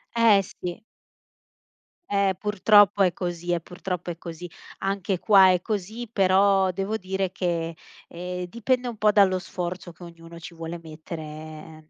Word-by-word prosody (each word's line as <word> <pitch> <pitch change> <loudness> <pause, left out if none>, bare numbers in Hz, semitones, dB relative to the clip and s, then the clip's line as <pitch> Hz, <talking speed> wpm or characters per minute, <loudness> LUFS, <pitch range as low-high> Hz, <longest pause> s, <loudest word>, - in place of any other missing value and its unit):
Eh, 225 -4 +5
sì. 180 +2 -7 1.3
Eh, 200 -2 +2
purtroppo 205 -1 +4
è 180 - +3
così, 175 -1 -4
eh, 175 - +1
purtroppo 180 +1 -6
è 170 - -8
così. 170 0 -8 0.3
Anche 195 -1 -2
qua 190 -3 +6
è 180 - +1
così, 215 +4 -4
però 195 -2 +3
devo 195 +4 -3
dire 190 -2 -2
che, 170 -3 -2 0.3
ehm, 180 +1 -5
dipende 245 +5 -1
un 235 - -4
po' 210 0 +3
dallo 195 -3 +4
sforzo 180 0 -5
che 170 +2 -15
ognuno 170 0 -12
ci 170 +1 -10
vuole 165 +1 -6
mettere, 160 +1 -8
ehm, 155 0 -10
180 Hz, 150 wpm, -25 LUFS, 170-200 Hz, 1.3 s, qua